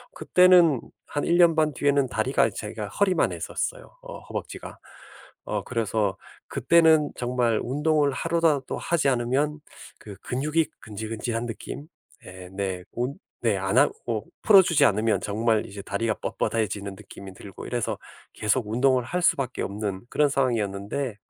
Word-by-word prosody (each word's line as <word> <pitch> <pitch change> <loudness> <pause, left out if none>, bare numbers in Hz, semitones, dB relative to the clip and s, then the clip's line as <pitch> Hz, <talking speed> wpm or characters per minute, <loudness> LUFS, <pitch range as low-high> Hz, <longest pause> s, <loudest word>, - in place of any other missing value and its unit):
그때는 180 -6 +5 0.3
한 145 - -3
1 170 - +3
년 170 -2 +6
반 155 -2 +2
뒤에는 140 0 +2
다리가 115 +1 +1
제가 105 +1 -6
허리만 190 - +1
했었어요, - - -5
어 - - -9
허벅지가. - - -7 0.7
어 - - -2
그래서 110 -4 -1 0.3
그때는 160 +1 +4
정말 120 -2 0
운동을 150 +2 +1
하루라도 165 -4 0
하지 165 -5 +1
않으면 135 +5 0 0.4
그 105 -2 -10
근육이 150 +5 0
근질근질한 110 +2 -4
느낌? 130 +5 -7 0.4
예 90 0 -10
네, 95 -2 -3
운 125 +3 -2 0.3
네, 115 -4 +2
안 95 +4 -1
하고 115 -6 0 0.2
풀어주지 185 -8 +6
않으면 110 -1 +2
정말 110 +1 0
이제 100 0 -8
다리가 105 +3 -1
뻣뻣해지는 100 -3 -2
느낌이 100 -2 -11
들고 95 0 -10
이래서 120 -2 -2 0.4
계속 110 +2 0
운동을 125 +2 +2
할 180 +8 -2
수밖에 135 -6 +1
없는 100 -1 -4
그런 150 - +3
상황이었는데, 115 -2 -1
125 Hz, 315 characters per minute, -25 LUFS, 105-150 Hz, 0.7 s, 년